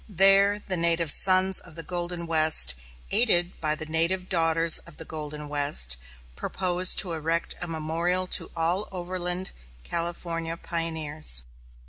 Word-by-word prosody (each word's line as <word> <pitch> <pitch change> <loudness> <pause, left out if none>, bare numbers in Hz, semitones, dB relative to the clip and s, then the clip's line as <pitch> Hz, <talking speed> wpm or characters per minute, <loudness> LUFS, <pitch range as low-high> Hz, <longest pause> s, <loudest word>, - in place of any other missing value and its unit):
There 195 +1 +3
the 195 -3 -5
Native 170 -2 +1
Sons 185 +1 +4
of 175 -3 -15
the 165 - -9
Golden 175 -1 -5
West, 155 - +4 0.4
aided 175 -7 +2
by 155 -1 0
the 155 0 -7
Native 170 +4 -1
Daughters 165 -1 +2
of 170 - -16
the 160 - -9
Golden 150 -1 -8
West, 145 - +1 0.4
propose 185 - +2
to 180 -4 +3
erect 165 +1 -1
a 175 - -5
memorial 165 +3 -2
to - - +1
all 170 +5 -1
overland 180 0 -4 0.3
California 170 -1 -4
pioneers. 160 - +2
170 Hz, 135 wpm, -25 LUFS, 160-180 Hz, 0.4 s, Sons